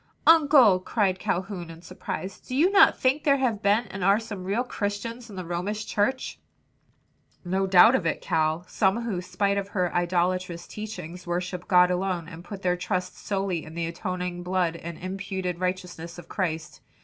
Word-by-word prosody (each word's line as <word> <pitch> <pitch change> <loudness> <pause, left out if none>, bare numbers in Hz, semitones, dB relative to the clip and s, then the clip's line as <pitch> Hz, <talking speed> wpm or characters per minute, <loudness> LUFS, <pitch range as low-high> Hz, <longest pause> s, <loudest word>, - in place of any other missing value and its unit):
"Uncle!" 285 - +7
cried 190 -1 0
Calhoun 180 -1 -3
in 165 +1 -11
surprise, 185 +1 -6
"do 255 - -7
you 335 +8 +4
not 405 0 +6
think 270 +3 +2
there 280 -2 +4
have 240 -6 0
been 210 +4 +3
and 190 -1 -5
are 200 +3 +4
some 210 -5 -7
real 205 +6 0
Christians 230 +1 -4
in 205 - -10
the 185 -1 -5
Romish 185 +5 -3
Church?" 255 +6 -1 1.1
"No 190 +2 0
doubt 190 +5 +7
of 190 -10 +1
it, - - -1
Cal; 160 0 0
some 205 +4 +1
who, 200 -6 -2
spite 200 +2 0
of 200 - -5
her 180 -3 -1
idolatrous 175 0 0
teachings, 180 -5 -8
worship 180 +1 -3
God 180 -1 +5
alone 180 -2 -1
and 165 +1 -10
put 195 +2 -9
their 180 -1 +2
trust 185 0 -2
solely 195 -4 -2
in 160 +1 -11
the 170 -1 -1
atoning 180 0 -4
blood 180 -2 0
and 170 -1 -7
imputed 185 -1 -4
righteousness 180 -2 -4
of 175 -2 -11
Christ. 160 -5 -3
185 Hz, 175 wpm, -26 LUFS, 175-205 Hz, 1.1 s, Uncle